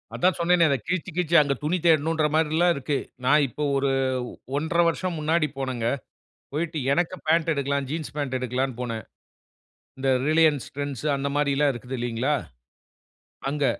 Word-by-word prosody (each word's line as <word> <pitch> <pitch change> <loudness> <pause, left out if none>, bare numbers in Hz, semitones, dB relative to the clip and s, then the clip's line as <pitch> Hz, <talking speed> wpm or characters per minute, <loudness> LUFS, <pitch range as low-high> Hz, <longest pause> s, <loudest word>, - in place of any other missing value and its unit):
அதான் 185 0 +2
சொன்னேனே! 170 0 +4
அத 140 - +3
கிழிச்சி, 185 0 -1
கிழிச்சி 175 -2 +1
அங்கே 140 -1 0
துணி 165 +5 +1
தேடணுன்ற 160 -1 +3
மாரில்லாம் 160 +2 +3
இருக்கு. 140 +1 -1 0.3
நான் 145 +3 +5
இப்போ 150 +4 -5
ஒரு 135 0 +1 0.7
1-1/2 160 +4 +2
வருஷம் 175 +1 -2
முன்னாடி 155 +1 +1
போனங்க. 130 -4 -2 0.7
போய்ட்டு 160 +2 -2 0.2
எனக்கு 175 +3 0
பேண்ட் 165 +1 +3
எடுக்கலாம், 140 -1 -1
ஜீன்ஸ் 155 -1 -4
பேண்ட் 130 -3 -1
எடுக்கலான்னு 125 0 -2
போனேன். 115 -3 -4 1.0
இந்த 135 - 0 0.2
ரிலையன்ஸ் 155 -3 +3
ட்ரெண்ட்ஸ் 145 -1 -4
அந்த 140 +1 -2
மாரிலாம் 145 0 +2
இருக்குது 125 +2 -6
இல்லீங்களா, 120 +4 0 1.2
அங்க. 145 -1 0
150 Hz, 145 wpm, -25 LUFS, 135-165 Hz, 1.2 s, நான்